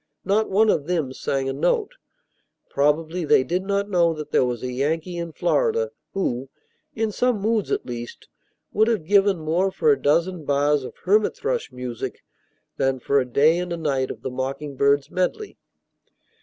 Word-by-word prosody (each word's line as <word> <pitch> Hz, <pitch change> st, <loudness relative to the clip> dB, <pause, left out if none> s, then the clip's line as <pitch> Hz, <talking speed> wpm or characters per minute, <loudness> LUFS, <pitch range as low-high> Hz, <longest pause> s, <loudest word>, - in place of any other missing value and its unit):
Not 210 Hz, +3 st, +2 dB
one 215 Hz, +2 st, +4 dB
of 145 Hz, -, -1 dB
them 160 Hz, -7 st, -1 dB
sang 135 Hz, 0 st, -2 dB
a 135 Hz, -, -1 dB
note. 430 Hz, -, 0 dB, 0.8 s
Probably 155 Hz, +5 st, +1 dB
they 145 Hz, -, +4 dB
did 180 Hz, +6 st, -1 dB
not 200 Hz, +1 st, -1 dB
know 170 Hz, -4 st, +2 dB
that 150 Hz, -1 st, -7 dB
there -, -, +4 dB
was 125 Hz, -1 st, -2 dB
a 125 Hz, -, -3 dB
Yankee 160 Hz, +7 st, -2 dB
in 170 Hz, -1 st, -4 dB
Florida 465 Hz, -, +1 dB, 0.2 s
who 130 Hz, -9 st, -2 dB, 0.5 s
in 225 Hz, -3 st, -1 dB
some 245 Hz, 0 st, +1 dB
moods, 215 Hz, 0 st, 0 dB
at -, -, -1 dB
least 120 Hz, -1 st, -7 dB, 0.5 s
would 220 Hz, +1 st, +3 dB
have 220 Hz, -9 st, 0 dB
given 200 Hz, +1 st, +4 dB
more 165 Hz, +4 st, 0 dB
for 450 Hz, -, +2 dB
a 425 Hz, -, +1 dB
dozen 170 Hz, +3 st, +1 dB
bars 145 Hz, 0 st, +2 dB
of -, -, -8 dB
hermit 205 Hz, +3 st, +2 dB
thrush 480 Hz, +2 st, -2 dB
music 125 Hz, -2 st, -6 dB, 0.5 s
than 135 Hz, -1 st, +1 dB
for 140 Hz, +3 st, +2 dB
a 130 Hz, -, 0 dB
day 155 Hz, +7 st, +4 dB
and 180 Hz, 0 st, -4 dB
a 170 Hz, -, -2 dB
night 135 Hz, -5 st, -1 dB
of -, -, -8 dB
the 130 Hz, -, -3 dB
mocking 135 Hz, +3 st, -4 dB
bird's 140 Hz, +1 st, +2 dB
medley. 290 Hz, -, -2 dB
165 Hz, 180 wpm, -23 LUFS, 140-200 Hz, 0.8 s, one